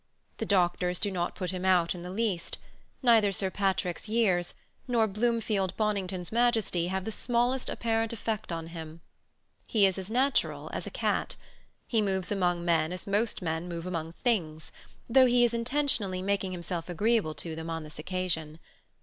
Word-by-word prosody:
The - - -2
doctors 180 -2 +2
do 205 +2 +1
not 175 -2 -2
put 185 -3 -2
him 185 -1 -4
out 180 -3 +3
in 175 - -8
the 180 - -6
least: 195 -3 -1 0.5
neither 225 -5 +5
Sir 190 0 -1
Patrick's 185 -1 -1
years 190 -6 +2 0.3
nor 235 -3 +3
Bloomfield 210 -3 0
Bonington's 195 -4 -1
majesty 225 -7 +2
have 190 +1 -2
the 220 - -2
smallest 245 +3 0
apparent 225 -1 0
effect 220 -3 -3
on 165 -1 -3
him: 165 -1 -8 0.7
he 210 -3 +4
is 190 0 +1
as 190 +1 -5
natural 260 +4 +1
as - - -4
a - - -3
cat: - - -1 0.5
he 225 -3 +1
moves 190 -2 -1
among 175 -3 +1
men 165 -1 +2
as 180 - -5
most 205 0 0
men 165 +1 -2
move 170 0 -5
among 165 -3 -3
things, 165 -9 -1 0.4
though 255 +2 +6
he 245 0 +4
is 235 - 0
intentionally 230 -6 0
making 200 -1 0
himself 175 -1 -4
agreeable 205 -2 +1
to 160 +2 -5
them 160 +1 -6
on 165 -1 -3
this 150 0 -10
occasion. 160 -3 -2
190 Hz, 170 wpm, -29 LUFS, 175-225 Hz, 0.7 s, though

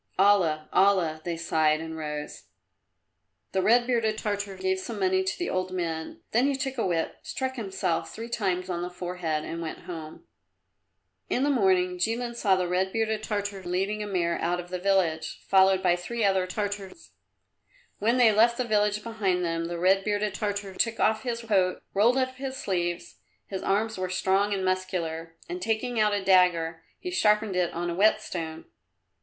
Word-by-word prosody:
"Allah! 180 -6 +3
Allah!" 180 -5 +3
they 170 0 -3
sighed 155 -2 +2
and 160 0 -6
rose. 150 -1 -6 1.1
The 190 - +1
red 240 +4 +4
bearded 230 -3 +1
Tartar 205 -2 -3
gave 190 0 0
some 215 +2 -6
money 190 0 +2
to 190 0 -2
the 355 - -2
old 185 0 -1
men, 165 -3 -4
then 245 +5 +3
he 280 - +1
took 265 -1 -3
a 225 - +1
whip, 165 -2 -1
struck 260 0 -3
himself 190 -6 -2
three 225 +1 -7
times 190 -6 -1
on 175 -2 -3
the 175 - -3
forehead 175 -3 -3
and 165 +1 -5
went 160 - -5
home. 160 - -8 1.0
In 255 - +1
the 290 - +3
morning 185 -6 +2
Jilin 235 +5 -1
saw 200 -5 +3
the 180 -1 0
red 185 +2 0
bearded 220 0 0
Tartar 205 -2 -3
leading 190 +4 -1
a 210 - -3
mare 170 -4 0
out 175 +1 0
of 175 0 -7
the 180 - -2
village, 180 -4 +1
followed 190 -1 +5
by 175 -1 +4
three 225 +6 -3
other 190 -2 +2
Tartars. 205 - -5 0.9
When 230 +4 +2
they 240 -3 +6
left 230 +3 +4
the 255 - +1
village 210 -2 +1
behind 195 -6 0
them 165 0 -1
the 170 0 -4
red 190 +3 +3
bearded 205 -1 0
Tartar 205 -1 -3
took 230 +4 0
off 220 0 +2
his 235 -2 -3
coat, 195 -5 +1
rolled 230 +6 +4
up 260 0 -1
his 265 0 -5
sleeves 175 -7 -2 0.3
his 190 -1 -5
arms 215 +1 0
were 185 0 -2
strong 195 +2 +1
and 195 -2 -1
muscular 170 -3 -2
and 360 +1 -5
taking 225 0 -1
out 210 -1 +4
a 200 -1 -3
dagger, 175 -3 +3
he 360 - -6
sharpened 210 - +2
it 180 -1 +1
on 175 +1 -3
a - - -3
whetstone. 170 -5 0
190 Hz, 185 wpm, -27 LUFS, 175-220 Hz, 1.1 s, they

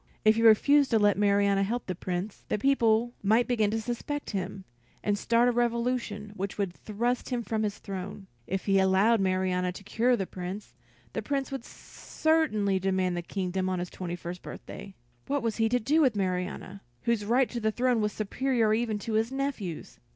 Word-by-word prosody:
If 215 0 +6
he 230 - 0
refused 275 +6 +6
to 230 - +3
let 205 -2 +4
Marianna 200 -1 +3
help 230 +5 -1
the 185 - -3
Prince, 180 +3 -4
the - - +1
people 235 -1 +2
might 220 +4 +3
begin 220 -4 +2
to 225 +2 -1
suspect 245 +6 -4
him, 195 -1 -4 0.4
and 205 - +1
start 230 +3 +2
a - - +4
revolution 235 -3 -1
which 195 +1 -4
would 195 -4 -1
thrust 235 +6 -2
him 245 -2 -1
from 220 -1 -2
his 210 -1 -2
throne; 195 0 -7 0.2
if 190 0 -3
he 195 -1 +3
allowed 195 +4 +4
Marianna 185 -1 +1
to 195 - -10
cure 240 +5 +2
the 195 - -2
Prince, 185 +3 -7 0.4
the - - -2
Prince 275 -1 -2
would 270 -3 -4
certainly 215 -17 0
demand 185 -1 0
the 175 - -2
kingdom 185 +1 -2
on 185 - -1
his 175 0 -4
twenty 175 -2 -5
first 175 +1 -7
birthday. 195 -1 -9 0.3
What 285 -2 -1
was 225 -2 -1
he 225 -1 +2
to 245 +2 +2
do 300 +8 +2
with 260 -7 +3
Marianna, 185 0 -3 0.2
whose 235 -3 +1
right 245 +4 +3
to 240 - -3
the 220 -1 +1
throne 245 0 +1
was 210 0 0
superior 225 +2 0
even 220 -1 0
to 220 +2 -5
his 220 +3 +1
nephew's? 270 - -4
215 Hz, 195 wpm, -28 LUFS, 195-240 Hz, 0.4 s, If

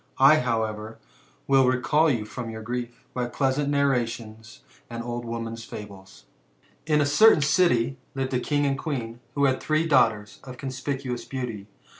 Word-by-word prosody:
I, 140 +4 +7
however, 110 -3 -2 0.5
will 135 -1 +4
reicall 150 +5 +3
you 115 -5 -1
from 120 +1 -6
your 110 -1 -7
grief^ 120 +1 -3 0.2
by 125 -1 -2
pleasant 135 +3 0
narrations, 120 -5 -1 0.3
and 115 0 -5
old 120 0 -4
women's 115 0 -5
foMes. 100 -3 -11 0.3
*' - - -35
In 150 0 +4
a - - +4
oertftin 150 +3 +5
city 140 -6 +2 0.2
lived 135 -1 -2
a 125 - +2
king 145 +2 0
and 135 -1 0
queen, 120 -7 -4 0.2
who 140 -1 +3
had 130 -1 +1
three 155 +1 +1
daughtera 105 -8 +2
of 130 -2 -10
com^icuous 130 -2 -4
beauty. 120 -7 -5
125 Hz, 160 wpm, -25 LUFS, 115-140 Hz, 0.5 s, I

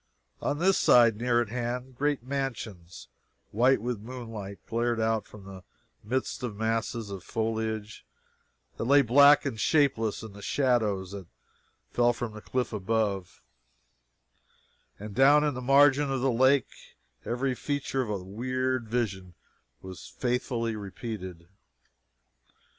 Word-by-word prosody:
On 145 - -1
this 185 +4 +3
side, 115 -3 +5
near 120 +1 +2
at 120 - -3
hand, 125 +2 -4
great 145 -1 -1
mansions, 115 -10 -5 0.4
white 125 +5 +3
with 120 0 -3
moonlight, 110 -4 -8
glared 120 0 -1
out 110 -1 0
from 105 -2 -13
the 95 -1 -10 0.4
midst 130 +5 -2
of 120 -5 -4
masses 110 0 -2
of 95 -3 -7
foliage 110 0 -3 0.7
that - - -3
lay 140 +3 +5
black 140 +5 +6
and 120 -6 -3
shapeless 115 -7 +1
in 110 -3 -9
the 100 - -12
shadows 110 -8 0
that 100 -3 -8 0.6
fell 120 0 +3
from 120 -2 -5
the 105 - -9
cliff 125 0 -2
above 100 -3 -2 1.5
and 105 0 -8
down 140 +5 +5
in 150 -1 +1
the 125 - -6
margin 140 +2 +4
of 135 - 0
the 135 0 +2
lake 130 +2 +3 0.5
every 130 +2 -1
feature 140 0 -2
of 125 - -3
the 90 - -10
weird 130 +4 -2
vision 95 -7 -3 0.5
was 95 -1 -9
faithfully 120 -2 -2
repeated. 95 -4 -7
115 Hz, 135 wpm, -28 LUFS, 105-130 Hz, 1.5 s, black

